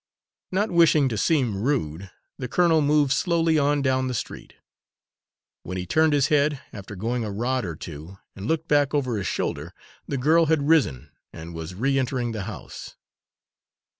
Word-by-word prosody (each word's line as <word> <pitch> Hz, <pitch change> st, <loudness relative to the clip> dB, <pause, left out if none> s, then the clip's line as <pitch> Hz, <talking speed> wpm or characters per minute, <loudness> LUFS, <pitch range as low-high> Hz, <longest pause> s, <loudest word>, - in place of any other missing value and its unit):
Not 205 Hz, +3 st, 0 dB
wishing 160 Hz, -5 st, +4 dB
to 115 Hz, -, -3 dB
seem 120 Hz, -4 st, +1 dB
rude, 100 Hz, -, -2 dB, 0.3 s
the 125 Hz, -, -3 dB
colonel 165 Hz, +3 st, +3 dB
moved 145 Hz, -1 st, +3 dB
slowly 165 Hz, 0 st, +2 dB
on 145 Hz, 0 st, +1 dB
down 130 Hz, -1 st, +1 dB
the 125 Hz, -, -3 dB
street. -, -, -7 dB, 1.1 s
When 90 Hz, +1 st, -6 dB
he 90 Hz, -, -4 dB
turned 155 Hz, -, +3 dB
his 145 Hz, -1 st, +2 dB
head, 150 Hz, -1 st, +2 dB
after 100 Hz, 0 st, -8 dB
going 115 Hz, +5 st, -2 dB
a 110 Hz, -, -4 dB
rod 120 Hz, +4 st, -1 dB
or 85 Hz, -3 st, -5 dB
two, 80 Hz, +4 st, -9 dB, 0.2 s
and 95 Hz, +3 st, -6 dB
looked 160 Hz, 0 st, -1 dB
back 145 Hz, 0 st, +2 dB
over 130 Hz, -6 st, 0 dB
his 95 Hz, -4 st, -3 dB
shoulder, -, -, -3 dB, 0.3 s
the 140 Hz, -, -2 dB
girl 160 Hz, +5 st, +3 dB
had 150 Hz, -2 st, +1 dB
risen 135 Hz, -, +2 dB, 0.2 s
and 80 Hz, +1 st, -9 dB
was 80 Hz, +2 st, -7 dB
re 135 Hz, +6 st, +1 dB
entering 125 Hz, -2 st, -1 dB
the 110 Hz, -4 st, -5 dB
house. 105 Hz, -, -9 dB
130 Hz, 170 wpm, -24 LUFS, 100-150 Hz, 1.1 s, wishing